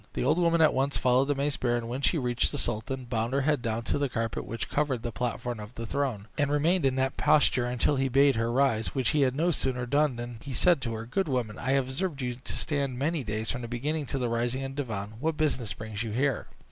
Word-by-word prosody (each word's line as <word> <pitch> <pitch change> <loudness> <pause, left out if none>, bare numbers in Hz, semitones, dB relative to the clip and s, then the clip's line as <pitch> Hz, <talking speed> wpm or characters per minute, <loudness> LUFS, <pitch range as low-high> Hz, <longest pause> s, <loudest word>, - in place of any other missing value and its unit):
The - - -2
old 155 +7 +3
woman 170 -1 +3
at 155 - +5
once 135 +2 +1
followed 130 +1 +3
the 145 - +1
mace 140 +1 0
bearer, 120 -1 +1
and 115 -1 -4
when 125 +3 -4
she 160 - +3
reached 125 -4 0
the - - -4
sultan, 120 +3 -3
bowed 115 0 -2
her 140 - +2
head 145 -1 +1
down 115 0 -2
to 115 - -1
the 140 -1 0
carpet 115 -2 -2
which 115 -1 -4
covered 140 -5 -1
the 120 - -3
platform 120 0 -3
of 105 +3 -9
the 115 - -5
throne, 120 -6 -2
and 145 -1 +2
remained 155 +2 +3
in 130 - 0
that 130 0 0
posture 125 -4 +3
till 140 +4 +2
he 135 0 +1
bade 135 +1 +5
her 115 +1 0
rise, 125 -3 +1
which 130 -3 +1
she 150 - +2
had 130 -1 +2
no 170 +4 +2
sooner 130 -5 -1
done 145 +1 +2
than 120 0 -6
he 140 - -6
said 170 +4 +4
to 115 -3 -2
her, 110 +1 -5
"Good 175 +11 -1
woman, 120 -6 -2
I 130 +2 0
have 135 -2 +2
observed 140 +1 -3
you 125 0 -1
to 125 +1 -6
stand 140 -4 -1
many 150 +2 0
days, 110 0 -2
from 125 - -4
the 120 - -5
beginning 140 +5 -2
to 135 - -1
the 125 -2 0
rising 120 +3 -1
of 135 - -4
the 145 - -1
divan; 105 -5 -5
what 155 +2 -1
business 135 -9 0
brings 110 -1 -5
you 115 - -3
here?" 135 +1 0
130 Hz, 265 wpm, -28 LUFS, 120-140 Hz, -, at